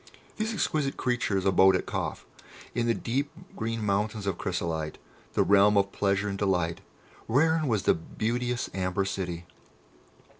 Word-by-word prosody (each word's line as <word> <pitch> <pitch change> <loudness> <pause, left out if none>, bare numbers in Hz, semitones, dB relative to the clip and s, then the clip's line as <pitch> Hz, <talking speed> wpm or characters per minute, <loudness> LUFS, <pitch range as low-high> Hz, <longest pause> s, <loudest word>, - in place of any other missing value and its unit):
These 220 +1 -1
exquisite 155 -9 -1
creatures 120 -6 0
abode 95 0 +6
at - - -1
Kâf, - - -3 0.5
in 120 0 0
the 115 - +2
deep 135 +5 -1 0.3
green 115 -1 -2
mountains 105 +1 0
of 100 -3 0
Chrysolite, 80 -4 -2 0.4
the - - +3
realm 100 +1 +5
of 100 0 +2
Pleasure 100 0 +1
and 100 -1 -3
Delight, 90 -4 0 0.5
wherein 160 +5 +3
was 110 -5 +1
the - - +5
beauteous 120 +8 -2
Amber 95 +1 0
City. 90 -3 -4
100 Hz, 145 wpm, -28 LUFS, 95-120 Hz, 0.5 s, abode